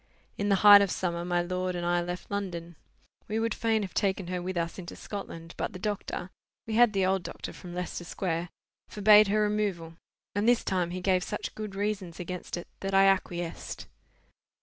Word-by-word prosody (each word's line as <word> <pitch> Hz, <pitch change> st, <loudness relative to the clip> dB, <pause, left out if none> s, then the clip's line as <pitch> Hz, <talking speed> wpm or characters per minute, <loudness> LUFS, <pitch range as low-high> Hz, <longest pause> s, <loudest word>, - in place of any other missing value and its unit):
In 205 Hz, 0 st, -1 dB
the 200 Hz, -, +5 dB
height 205 Hz, -1 st, +11 dB
of 200 Hz, -, +2 dB
summer 170 Hz, -1 st, -2 dB
my 175 Hz, 0 st, +1 dB
lord 185 Hz, +1 st, -2 dB
and 175 Hz, 0 st, -3 dB
I 175 Hz, 0 st, +2 dB
left 175 Hz, +2 st, -6 dB
London. 175 Hz, -4 st, -4 dB, 0.5 s
We 215 Hz, -, -2 dB
would 225 Hz, 0 st, 0 dB
fain 225 Hz, -2 st, +1 dB
have 190 Hz, -, -6 dB
taken 195 Hz, -2 st, 0 dB
her 180 Hz, -1 st, -2 dB
with 185 Hz, 0 st, -4 dB
us 170 Hz, +2 st, -2 dB
into 175 Hz, -1 st, -8 dB
Scotland, 165 Hz, -5 st, -7 dB
but -, -, -3 dB
the -, -, -6 dB
doctor 190 Hz, -2 st, -4 dB, 0.3 s
(we 225 Hz, -, -4 dB
had 235 Hz, -1 st, +5 dB
the 195 Hz, -1 st, +2 dB
old 190 Hz, 0 st, +2 dB
doctor -, -, -7 dB
from 175 Hz, -1 st, -9 dB
Leicester 180 Hz, 0 st, -4 dB
Square) 175 Hz, -1 st, -3 dB, 0.4 s
forbade 210 Hz, 0 st, +6 dB
her 215 Hz, +2 st, +2 dB
removal; 205 Hz, -6 st, -1 dB, 0.4 s
and 205 Hz, +3 st, +2 dB
this 245 Hz, -, +3 dB
time 180 Hz, -2 st, 0 dB
he 180 Hz, +1 st, -4 dB
gave 185 Hz, -1 st, +2 dB
such 210 Hz, -, -4 dB
good 210 Hz, -2 st, -6 dB
reasons 195 Hz, -4 st, -3 dB
against 180 Hz, 0 st, -5 dB
it 175 Hz, -, -7 dB
that 195 Hz, 0 st, -2 dB
I 195 Hz, 0 st, +7 dB
acquiesced. 175 Hz, -3 st, -1 dB
185 Hz, 195 wpm, -29 LUFS, 175-205 Hz, 0.5 s, height